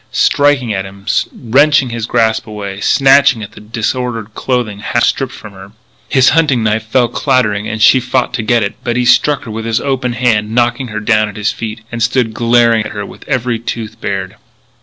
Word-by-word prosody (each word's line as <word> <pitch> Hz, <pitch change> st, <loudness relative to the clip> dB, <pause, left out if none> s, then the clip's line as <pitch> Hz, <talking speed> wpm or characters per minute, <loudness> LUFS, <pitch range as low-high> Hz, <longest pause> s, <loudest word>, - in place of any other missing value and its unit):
striking 140 Hz, -6 st, +2 dB
at 95 Hz, -1 st, -2 dB
him, 100 Hz, +1 st, -12 dB, 0.3 s
wrenching 135 Hz, +2 st, +2 dB
his 115 Hz, -1 st, -4 dB
grasp 110 Hz, 0 st, +1 dB
away, 100 Hz, -2 st, -6 dB
snatching 135 Hz, -4 st, +4 dB
at 100 Hz, -, -9 dB
the -, -, -13 dB
disordered 115 Hz, 0 st, -3 dB
clothing 120 Hz, -6 st, -2 dB
half 120 Hz, +3 st, -1 dB
stripped 135 Hz, -2 st, 0 dB
from 105 Hz, -5 st, -11 dB
her. 95 Hz, +1 st, -13 dB, 0.4 s
His 130 Hz, -2 st, +4 dB
hunting 145 Hz, -7 st, +2 dB
knife 110 Hz, +1 st, -1 dB
fell 120 Hz, +2 st, +2 dB
clattering 115 Hz, -5 st, 0 dB
and 110 Hz, -, -4 dB
she 130 Hz, +4 st, +6 dB
fought 125 Hz, 0 st, -1 dB
to -, -, -2 dB
get 115 Hz, +1 st, +1 dB
it, 100 Hz, -, -3 dB
but 120 Hz, 0 st, -1 dB
he 125 Hz, -, +1 dB
struck 145 Hz, +3 st, +3 dB
her 115 Hz, -, -8 dB
with 110 Hz, +1 st, -5 dB
his 115 Hz, 0 st, 0 dB
open 130 Hz, -2 st, -2 dB
hand, 115 Hz, -3 st, 0 dB
knocking 120 Hz, +1 st, +1 dB
her 110 Hz, -1 st, -5 dB
down 110 Hz, -1 st, +2 dB
at 100 Hz, -, -11 dB
his 105 Hz, 0 st, -1 dB
feet, 110 Hz, 0 st, -6 dB
and 120 Hz, 0 st, -5 dB
stood 115 Hz, -1 st, +1 dB
glaring 115 Hz, -1 st, +3 dB
at -, -, -7 dB
her 105 Hz, -1 st, -5 dB
with -, -, -13 dB
every 125 Hz, -2 st, -1 dB
tooth 110 Hz, -1 st, -6 dB
bared. 95 Hz, +1 st, -4 dB
115 Hz, 200 wpm, -14 LUFS, 110-125 Hz, 0.4 s, she